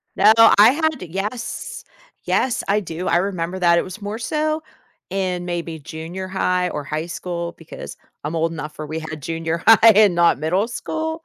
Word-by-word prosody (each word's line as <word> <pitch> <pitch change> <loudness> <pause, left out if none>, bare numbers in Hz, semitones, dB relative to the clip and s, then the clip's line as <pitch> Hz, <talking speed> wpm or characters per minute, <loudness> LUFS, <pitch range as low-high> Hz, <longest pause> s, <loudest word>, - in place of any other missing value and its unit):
No, 210 +3 +6
I 225 -1 +8
had 315 -1 -1
yes, 195 +7 -5 0.4
yes, 255 -2 0
I 200 +2 +2
do. 175 -2 -6
I - - +3
remember 180 -1 -2
that 170 -1 +4
it - - +2
was 185 +3 -9
more 205 +3 -5
so 310 +5 -1 0.5
in 185 -2 -2
maybe 170 -2 -4
junior 165 +6 -7
high 180 -1 0
or 150 - -4
high 155 +3 -3
school 170 -1 -5
because 165 - -10 0.3
I'm 155 +3 -3
old 165 +1 0
enough 150 -2 -7
where 155 - -5
we 155 +2 -4
had 155 -1 -7
junior 165 +3 -3
high 225 0 +8
and 205 -3 +6
not 170 -6 +3
middle 180 +8 0
school, 320 +6 -4
180 Hz, 180 wpm, -21 LUFS, 165-210 Hz, 0.5 s, I